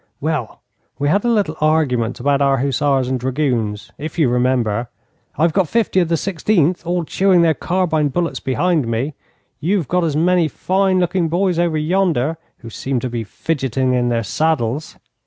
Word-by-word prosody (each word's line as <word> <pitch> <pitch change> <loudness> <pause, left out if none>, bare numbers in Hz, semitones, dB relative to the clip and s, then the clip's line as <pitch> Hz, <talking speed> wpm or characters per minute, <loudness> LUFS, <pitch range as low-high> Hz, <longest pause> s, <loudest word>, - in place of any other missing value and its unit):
'Well, 150 -6 -3 0.3
we 145 - 0
had 200 +5 +2
a - - +2
little 205 -9 +1
argument 140 -7 +1
about 140 +2 +1
our 135 -1 +3
hussars 135 0 +1
and 130 0 -1
dragoons, 125 -5 -2
if 155 +3 -6
you 155 -7 +3
remember. 125 -2 0 0.5
I've 160 +2 +2
got 190 -4 +2
fifty 225 -5 +1
of 175 - +2
the 165 - +2
Sixteenth 180 -1 0
all 175 0 0
chewing 185 +1 +3
their 165 -1 +4
carbine 165 -4 0
bullets 170 +4 -2
behind 155 +1 0
me. 120 +6 -2 0.5
You've 175 0 0
got 180 +3 +1
as 155 -3 0
many 175 +1 +3
fine 190 +4 0
looking 175 -1 0
boys 180 0 +1
over 170 -2 +1
yonder, 160 -3 0 0.2
who 115 - -9
seem 130 +3 -2
to 125 - -3
be 120 -1 -3
fidgeting 130 0 -1
in 120 -1 +1
their 115 -1 0
saddles. 150 +2 -1
155 Hz, 175 wpm, -19 LUFS, 130-175 Hz, 0.5 s, their